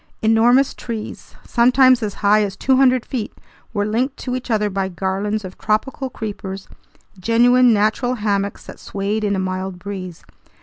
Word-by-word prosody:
Enormous 235 +5 +4
trees, 225 -3 -7
sometimes 255 +1 +4
as 210 -2 -3
high 210 +1 +5
as 195 -2 -3
200 255 -1 +3
feet, 230 -5 -4 0.4
were 205 -2 -1
linked 245 +6 -1
to 250 -1 -4
each 255 0 -6
other 210 -2 +1
by 195 -1 -2
garlands 195 +3 -2
of 185 - -10
tropical 260 +5 -1
creepers, 200 -4 -6 0.5
genuine 240 +4 +4
natural 220 +4 +1
hammocks 200 -2 -2
that - - -11
swayed 200 +2 -3
in 200 -1 +1
a - - -2
mild 185 0 -3
breeze. 185 -2 -7
215 Hz, 150 wpm, -20 LUFS, 200-245 Hz, 0.5 s, high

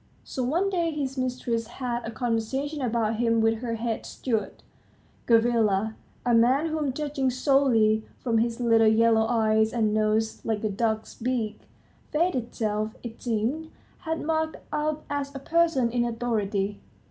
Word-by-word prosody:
So 260 - -5
one 345 +10 +1
day 340 -3 +1
his 280 -4 -3
mistress 245 -3 -2
had 240 0 -4
a - - -4
conversation 250 +5 -2
about 230 -3 0
him 230 -1 +2
with 225 0 +2
her 235 -1 -3
head 225 0 -2
steward, 225 -5 -3 0.6
Gavrila, 225 -3 +3 0.3
a 240 - +3
man 255 +7 +4
whom, 310 -3 -1
judging 285 -1 -1
solely 250 -5 +3
from 230 -3 0
his 230 +1 0
little 230 -2 +4
yellow 220 0 +4
eyes 220 -2 +2
and 220 -3 +1
nose 215 +1 +1
like 220 -1 -2
a 215 - +1
duck's 220 +1 -1
beak, 230 -3 -2 0.5
fate 340 +4 +2
itself, 220 -3 -2
it 235 -2 -8
seemed, 245 +8 -1 0.3
had 325 -2 -3
marked 315 0 0 0.2
out 300 0 -1
as 285 -1 -3
a - - -4
person 320 -5 +2
in 240 0 +1
authority. 215 -4 -1
235 Hz, 150 wpm, -26 LUFS, 220-275 Hz, 0.6 s, man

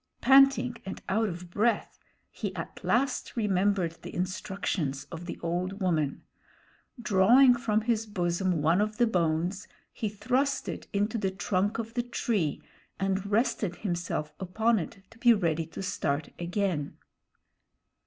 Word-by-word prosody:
Panting 265 -3 +5
and 190 - -6
out 220 +2 +2
of 175 0 -8
breath, 225 +5 0 0.3
he - - -5
at - - -7
last 255 0 0
remembered 195 -5 +1
the - - -8
instructions 180 -6 -2
of 170 +1 -7
the - - -5
old 180 +4 -2
woman. 160 -7 0 0.8
Drawing 235 +5 +6
from 220 -3 0
his 225 -1 0
bosom 175 -4 0
one 170 +6 +4
of 215 0 -1
the 240 - +4
bones, 175 -1 0 0.3
he 215 - -2
thrust 255 +7 0
it - - -5
into 210 +3 0
the 195 -2 0
trunk 190 +2 -1
of 230 0 -5
the 240 - +1
tree 225 -9 -1 0.4
and 195 +1 0
rested 210 -3 +1
himself 175 -6 -3
upon 220 +5 +1
it 190 +3 -7
to 225 - -18
be 240 -1 +6
ready 165 -5 0
to 165 - -7
start 150 -5 -1
again. 175 -4 -2
195 Hz, 145 wpm, -29 LUFS, 175-225 Hz, 0.8 s, Drawing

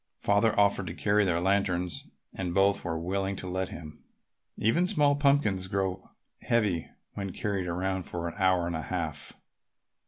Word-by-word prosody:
Father 105 +2 +2
offered 100 -2 +3
to 85 - -5
carry 105 +1 +2
their 85 -2 +1
lanterns 90 -2 0 0.3
and 90 -2 -3
both 100 +1 +3
were 80 -2 -2
willing 95 +3 -1
to 95 - -6
let 95 0 -2
him. 75 -2 -10 0.5
Even 170 +12 +2
small 150 -7 +3
pumpkins 140 -10 +2
grow 95 -1 -2 0.3
heavy 105 -8 +1 0.2
when 100 -2 -4
carried 100 -2 -2
around 95 +2 -1
for 85 -1 -4
an 85 - -5
hour 95 -2 +3
and 85 -1 -2
a 80 - -2
half. 80 -5 -3
95 Hz, 160 wpm, -29 LUFS, 90-100 Hz, 0.5 s, offered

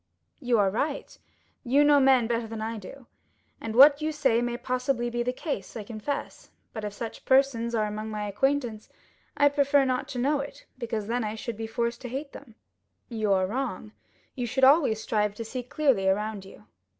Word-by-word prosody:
"You 245 -5 +1
are 200 -2 +3
right; 285 +7 -3 0.5
you 275 +3 +4
know 290 -1 +6
men 265 -3 +5
better 230 0 -1
than 225 0 -6
I 220 0 -4
do, 250 +7 -11 0.6
and 225 0 -5
what 285 +3 +8
you 310 +1 0
say 265 -6 +2
may 240 0 -2
possibly 250 -1 -1
be 240 0 -1
the 245 +1 0
case, 250 - -5
I 215 - -5
confess; 230 +6 -5 0.2
but 220 - -6
if 210 - -3
such 225 +2 -7
persons 260 -3 +2
are 215 -1 +1
among 215 +1 -5
my 210 -1 -4
acquaintances 240 -1 -1 0.5
I 285 - +5
prefer 280 -1 +3
not 255 +1 -1
to 280 -3 -6
know 280 +4 +1
it, 280 0 -8
because 225 -4 -3
then 235 +2 -1
I 215 0 -3
should 235 0 -5
be 225 +1 -5
forced 235 +1 -2
to 250 - -6
hate 275 +3 -5
them." 235 -6 -13 0.5
"You 215 -4 -1
are 190 -1 +2
wrong; 225 -1 -4 0.4
you 245 -2 -3
should 255 +3 -2
always 270 -5 +5
strive 210 -2 -1
to 230 - -6
see 255 +3 -4
clearly 250 -6 +1
around 210 0 -1
you. 190 - -15
240 Hz, 200 wpm, -27 LUFS, 220-275 Hz, 0.6 s, what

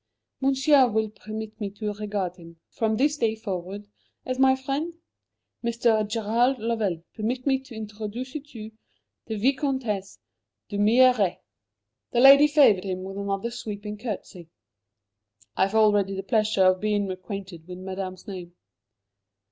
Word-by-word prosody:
"Monsieur 270 0 +4
will 220 0 0
permit 215 +1 -8
me 205 - -2
to 210 +1 -4
regard 205 -3 -3
him, 170 -1 -14
from 220 -1 0
this 295 +4 +2
day 225 -4 +1
forward, 200 -1 -6 0.4
as 255 0 -3
my 265 0 +5
friend? 280 +6 -3 0.7
Mr. 230 -2 +2
Gerald 230 +4 +1
Lovell, 215 -7 -1
permit 240 +3 -3
me 270 -2 +2
to 265 -3 -13
introduce 220 +3 -6
to 305 - -5
you 225 -7 -10 0.6
the 220 - -3
Vicomtesse 255 -5 -1 0.5
d'Humières!" 215 -1 +4 0.8
The 240 - +2
lady 275 +3 +9
favoured 280 -11 +5
him 185 -1 -3
with 195 +1 -6
another 200 +3 -2
sweeping 210 -3 -6
curtsey. 190 -7 -6 1.1
"I 190 - +3
have 200 - -7
already 205 -3 +3
the 195 - -4
pleasure 215 -2 +2
of 185 0 +4
being 205 -2 0
acquainted 185 -3 -7
with 180 0 -8
Madame's 185 0 -6
name." 180 -3 -8
215 Hz, 140 wpm, -25 LUFS, 195-250 Hz, 1.1 s, lady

